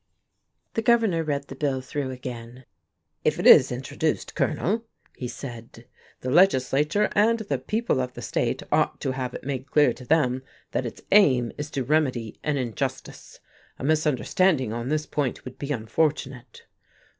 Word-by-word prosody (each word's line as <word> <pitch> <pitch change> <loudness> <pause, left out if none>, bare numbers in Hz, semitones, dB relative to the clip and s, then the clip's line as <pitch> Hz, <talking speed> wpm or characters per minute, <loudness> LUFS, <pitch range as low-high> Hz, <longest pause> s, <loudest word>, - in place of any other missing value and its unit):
The 225 - 0
Governor 225 -8 +3
read 140 -2 -2
the 135 - -8
bill 135 -1 -1
through 135 +1 -4
again. 125 -1 -8 0.6
"If - - +1
it - - -3
is - - +8
introduced, - - -2
Colonel," 220 +6 0 0.3
he 125 - -5
said, 120 -2 -9 0.4
"the 125 - -3
legislature 155 +3 +3
and 225 +3 +3
the 220 -3 -3
people 220 - 0
of 125 0 -4
the - - -7
state - - -1
ought - - +2
to 135 - -1
have 130 -1 -4
it - - -7
made 135 0 -4
clear 145 -5 +4
to 125 - -12
them 130 -3 +2 0.3
that - - -1
its - - -10
aim 130 - +5
is 145 0 -5
to 135 -3 -2
remedy 130 -5 0
an 150 -2 0
injustice. 120 -6 -5 0.4
A - - -9
misunderstanding 150 - +2
on 120 +2 -4
this 155 0 0
point 140 -4 -2
would 130 - -9
be 140 0 -4
unfortunate." 130 0 -2
140 Hz, 160 wpm, -25 LUFS, 125-155 Hz, 0.6 s, is